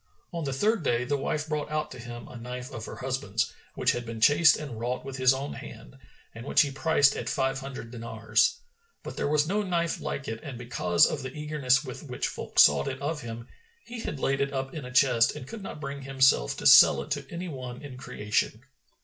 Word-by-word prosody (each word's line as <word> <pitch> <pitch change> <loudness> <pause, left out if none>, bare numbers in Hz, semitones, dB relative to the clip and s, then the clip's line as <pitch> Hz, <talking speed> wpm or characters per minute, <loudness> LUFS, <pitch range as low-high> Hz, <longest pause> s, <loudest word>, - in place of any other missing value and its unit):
On 170 -1 -3
the 135 - -2
third 210 +10 +1
day 120 -5 +1
the 140 +3 -1
wife 150 +2 -2
brought 150 -1 -2
out 155 0 -2
to 125 - -9
him 120 0 -8
a - - -12
knife 125 +1 -7
of 115 -1 -6
her - - -7
husband's, 125 -5 -2 0.2
which - - +2
he - - -2
had 115 -2 -7
chased 155 +4 +6
and 140 -7 -7
wrought 125 +2 -3
with 135 -1 -6
his 130 -1 +5
own 135 +2 -3
hand, - - -11 0.4
and 115 - -9
which 140 - +4
he 145 - 0
priced 145 0 +3
at - - -4
five 135 -2 0
hundred 135 -4 -8
dinars. 115 0 +1 0.5
But - - -7
there - - -1
was 150 +1 +2
no 205 +4 +1
knife 170 -4 -1
like 140 - -4
it 110 0 -4
and 140 -6 -7
because 90 -8 +2
of 150 - -2
the 130 -1 -6
eagerness 150 -3 +1
with 125 - -7
which 125 -5 -3
folk - - -8
sought 70 - +6
it 130 - -4
of 150 +2 -3
him, 115 0 -7 0.4
he 235 0 -8
had 150 -10 -5
laid 135 +1 0
it 140 0 0
up 135 -1 -3
in 150 -5 -6
a 125 - -8
chest 125 -3 +4
and 130 - -8
could 225 +5 -8
not 190 - -7
bring 140 -1 -6
himself 135 - +2
to - - -7
sell - - +8
it - - -14
to - - -3
any 175 +2 -5
one 130 -4 -7
in 140 -3 -8
creation. 105 -4 -2
135 Hz, 230 wpm, -27 LUFS, 120-150 Hz, 0.5 s, sell